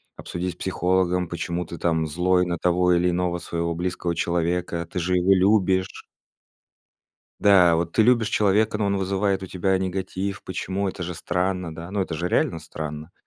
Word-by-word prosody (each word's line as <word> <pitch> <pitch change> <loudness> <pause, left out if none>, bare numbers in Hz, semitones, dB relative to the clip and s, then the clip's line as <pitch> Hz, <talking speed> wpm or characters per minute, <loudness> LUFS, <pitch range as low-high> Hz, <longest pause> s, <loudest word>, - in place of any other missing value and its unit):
обсудить 90 +1 -4
с - - -23
психологом, 90 -1 0
почему 85 +1 -3
ты 85 - -8
там 80 -2 0
злой 90 +3 +2
на 85 -1 -2
того 90 +1 +2
или 90 +1 +2
иного 90 0 -1
своего 85 -1 -3
близкого 90 0 -2
человека, 85 0 -1
ты 90 - -3
же 90 +2 0
его 90 +2 +4
любишь. 95 -1 +2 1.4
Да, 90 -5 +6
вот 85 0 -2
ты 110 - +4
любишь 115 -1 +3
человека, 105 +1 +2
но 105 - 0
он 100 0 +1
вызывает 95 0 0
у - - -7
тебя 95 +1 0
негатив, 95 +1 -3
почему? 95 +2 -3
Это 90 -1 -5
же 90 +1 -5
странно, 90 0 -2
да. 85 +2 -8
Ну 100 - -1
это 90 -3 -2
же 85 +3 -2
реально 85 - +1
странно. 80 0 -7
90 Hz, 175 wpm, -24 LUFS, 85-95 Hz, 1.4 s, Да